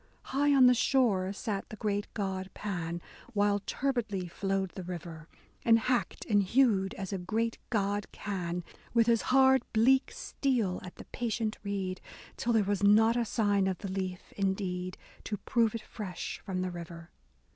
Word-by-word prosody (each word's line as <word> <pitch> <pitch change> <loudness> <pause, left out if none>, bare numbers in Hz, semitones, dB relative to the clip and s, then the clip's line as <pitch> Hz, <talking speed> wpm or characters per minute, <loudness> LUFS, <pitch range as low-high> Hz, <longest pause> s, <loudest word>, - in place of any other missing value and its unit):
High 285 +2 +1
on 260 -2 +7
the 250 - +8
shore 225 -7 +2
sat 200 0 -4
the - - -7
great 205 -1 -2
god 190 -2 -2
Pan, 175 -4 -4 0.3
While 205 -1 +2
turbidly 215 -5 -2
flowed 195 +1 -1
the 190 - -7
river; 170 -3 -7 0.4
And 230 -1 +6
hacked 245 +2 -1
and 205 -3 +3
hewed 200 -2 +3
as 195 0 -5
a 195 - -2
great 225 +5 -1
god 205 -2 -1
can. 180 -3 -3 0.3
With 230 -1 +5
his 230 -1 +3
hard 265 0 +6
bleak 260 +5 +4
steel 235 -10 -1
at 180 - -9
the - - -11
patient 225 -2 -2
reed. 195 -2 -3 0.3
Till 240 - -1
there 220 -2 +4
was 200 0 -1
not 220 +3 +5
a 240 -1 +1
sign 205 -3 +2
of 190 -2 -1
the 195 0 -6
leaf 185 -2 -4
indeed 185 -2 -2 0.3
To 210 - -2
prove 230 +1 +1
it 225 - -5
fresh 200 -5 -6
from 185 -3 -3
the 185 - -2
river. 170 -1 -9
205 Hz, 170 wpm, -30 LUFS, 185-230 Hz, 0.4 s, the